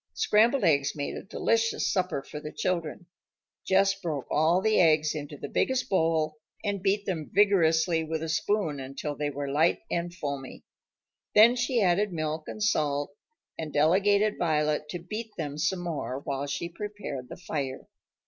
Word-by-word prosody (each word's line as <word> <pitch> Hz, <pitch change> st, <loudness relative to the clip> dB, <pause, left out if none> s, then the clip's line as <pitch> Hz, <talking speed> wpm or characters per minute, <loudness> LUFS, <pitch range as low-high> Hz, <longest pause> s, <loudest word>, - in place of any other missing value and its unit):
Scrambled 230 Hz, +5 st, +3 dB
eggs 140 Hz, -5 st, +2 dB
made 145 Hz, -1 st, -3 dB
a -, -, -5 dB
delicious 225 Hz, +2 st, 0 dB
supper 180 Hz, -8 st, -1 dB
for 150 Hz, -, -8 dB
the 150 Hz, 0 st, -7 dB
children. 170 Hz, -2 st, -2 dB, 0.6 s
Jess 195 Hz, +1 st, +4 dB
broke 165 Hz, -8 st, -4 dB
all 160 Hz, +4 st, +3 dB
the 215 Hz, +2 st, +2 dB
eggs 155 Hz, -2 st, +4 dB
into 145 Hz, -1 st, -6 dB
the 145 Hz, -, -6 dB
biggest 260 Hz, -, 0 dB
bowl 160 Hz, -4 st, +1 dB, 0.2 s
and 205 Hz, -3 st, -2 dB
beat 200 Hz, +1 st, +1 dB
them 160 Hz, -6 st, -3 dB
vigorously 165 Hz, -5 st, +3 dB
with 160 Hz, 0 st, -3 dB
a -, -, -3 dB
spoon 165 Hz, -2 st, 0 dB
until 135 Hz, +3 st, -5 dB
they 150 Hz, 0 st, -2 dB
were 140 Hz, -1 st, -4 dB
light 155 Hz, +4 st, +2 dB
and 175 Hz, 0 st, -1 dB
foamy. 140 Hz, -6 st, -6 dB, 0.7 s
Then 225 Hz, +3 st, +8 dB
she 245 Hz, -2 st, +1 dB
added 195 Hz, +3 st, +2 dB
milk 155 Hz, -1 st, -3 dB
and 215 Hz, -, -4 dB
salt 145 Hz, -7 st, 0 dB, 0.5 s
and 160 Hz, -2 st, -4 dB
delegated 200 Hz, +8 st, +3 dB
Violet 150 Hz, -2 st, 0 dB
to 175 Hz, -, -3 dB
beat 215 Hz, +6 st, -7 dB
them 150 Hz, -2 st, -4 dB
some 175 Hz, +3 st, 0 dB
more 155 Hz, -6 st, -3 dB
while 140 Hz, 0 st, -3 dB
she 145 Hz, +4 st, -3 dB
prepared 175 Hz, -, -6 dB
the -, -, -8 dB
fire. 145 Hz, -7 st, -4 dB
165 Hz, 165 wpm, -28 LUFS, 150-195 Hz, 0.7 s, Then